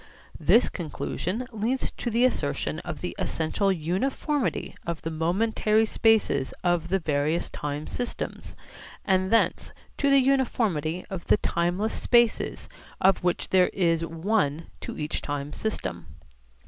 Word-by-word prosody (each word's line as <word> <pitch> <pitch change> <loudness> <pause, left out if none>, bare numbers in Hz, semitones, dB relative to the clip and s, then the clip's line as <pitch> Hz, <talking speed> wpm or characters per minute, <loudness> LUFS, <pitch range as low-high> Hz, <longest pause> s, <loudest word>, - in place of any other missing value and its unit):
This 235 - +5
conclusion 185 +6 -4
leads 230 +4 -1
to 240 - -4
the 235 +2 +3
assertion 255 - -1
of - - -6
the - - -4
essential 180 +5 0
uniformity 215 - -1
of 170 -2 -4
the 165 - -3
momentary 215 +6 +2
spaces 215 -12 +2
of 175 -2 +1
the 190 +2 +2
various 155 -1 0
time 145 +1 -4
systems, 245 - -5 0.5
and 190 -1 +2
thence 230 - +2 0.3
to 280 - +2
the 275 - +6
uniformity 225 - +1
of 190 -3 -5
the - - +5
timeless 180 +5 0
spaces 235 -2 +2 0.3
of 190 -1 +3
which 180 -1 0
there 185 -1 +4
is 165 -3 +2
one 165 -2 -1
to - - -7
each 150 0 -2
time 145 0 -4
system. 85 - -4
185 Hz, 135 wpm, -26 LUFS, 160-225 Hz, 0.5 s, the